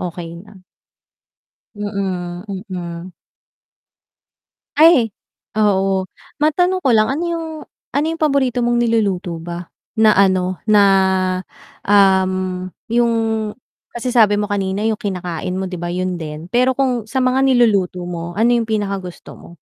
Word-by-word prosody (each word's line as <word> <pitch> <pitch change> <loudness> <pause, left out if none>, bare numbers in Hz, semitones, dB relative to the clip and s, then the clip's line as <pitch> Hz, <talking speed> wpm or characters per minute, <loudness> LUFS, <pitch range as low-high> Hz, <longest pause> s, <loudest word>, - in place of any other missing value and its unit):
okey 170 -1 -6
na. 190 -2 -17 1.1
Mm, 190 -3 -4 0.3
mm. 175 -1 -6 1.6
Ay, 300 -6 +6 0.5
oo, 195 -3 +2 0.3
matanong 355 +4 +1
ko 265 - +3
lang, 215 -1 +4
ano 290 +5 -2
yung 335 -1 -2 0.5
ano 290 +2 +2
yung 330 - -6
paborito 275 -5 +1
mong 240 0 +1
niluluto 195 -7 0
ba, 175 +1 -7 0.2
na 220 -1 +5
ano 185 -2 +2
na, 210 -1 +6 1.0
um, 185 -2 +2 0.2
yung 235 0 +3 0.8
kasi 245 +1 -2
sabi 220 -4 +5
mo 205 0 -2
kanina 195 0 -1
yung 220 -1 0
kinakain 180 -2 -4
mo 190 - -2
'di 180 - -5
ba, 175 - -4
yun 180 0 -2
din, 155 +2 -7
pero 255 +2 +2
kung 250 -5 0
sa 255 +4 -1
mga 255 +1 +2
niluluto 205 -8 +2
mo 175 -1 -6
ano 225 +4 +3
yung 235 -2 +1
pinaka 205 -3 -1
gusto 180 -2 -10
mo? - - -14
200 Hz, 135 wpm, -18 LUFS, 180-240 Hz, 1.6 s, Ay